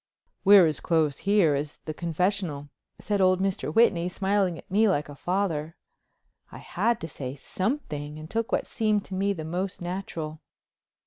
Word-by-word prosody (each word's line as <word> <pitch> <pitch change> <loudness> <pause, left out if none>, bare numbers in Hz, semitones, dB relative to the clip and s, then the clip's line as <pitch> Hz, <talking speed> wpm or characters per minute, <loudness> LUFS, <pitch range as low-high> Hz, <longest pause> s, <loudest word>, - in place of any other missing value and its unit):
"We're 200 -2 +8
as 155 -3 0
close 155 -5 +1
here 200 -7 +5
as 145 +1 -3
the 155 - -7
confessional," 170 -3 -2 0.3
said 205 -2 -1
old 185 0 +4
Mr. 195 0 -1
Whitney, 185 -7 +3
smiling 190 -2 0
at - - -14
me 215 +2 +4
like 150 -6 0
a 145 - -9
father. 165 -2 -2 0.8
I - - -9
had 235 -1 0
to 165 - -4
say 135 -3 -6
something 150 - -3
and 155 0 -8
took 230 +6 -2
what - - +1
seemed 215 -3 0
to 190 - -9
me 195 +2 +1
the 160 -6 -4
most 180 +4 -3
natural. 170 -4 -5
180 Hz, 170 wpm, -27 LUFS, 155-200 Hz, 0.8 s, We're